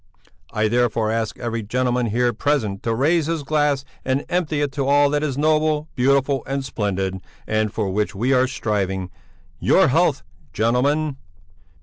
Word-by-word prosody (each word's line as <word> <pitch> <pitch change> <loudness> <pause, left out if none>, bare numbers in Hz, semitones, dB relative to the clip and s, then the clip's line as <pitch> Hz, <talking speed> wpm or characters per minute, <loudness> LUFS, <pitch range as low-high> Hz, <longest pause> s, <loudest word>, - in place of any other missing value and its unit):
I 110 0 +1
therefore 115 -1 +1
ask 115 -1 -2
every 115 -1 -3
gentleman 125 +2 0
here 120 +2 +1
present 110 -10 -1
to 115 -1 -1
raise 155 +5 +2
his 165 -2 -2
glass 145 -1 +1 0.2
and 130 +2 -1
empty 160 -4 0
it 145 -1 0
to 135 0 -2
all 145 0 +4
that 150 0 +1
is 140 -3 -2
noble, 155 0 +1
beautiful, 135 +1 +2
and 135 0 -2
splendid, 95 -5 -2 0.3
and 110 -1 0
for 110 -2 -2
which 105 0 -1
we 120 +7 +1
are 130 0 +3
striving. 95 -7 -2 0.5
Your 190 - +4
health, 155 0 +2 0.3
gentlemen!" 135 +6 +1
130 Hz, 155 wpm, -21 LUFS, 110-145 Hz, 0.5 s, all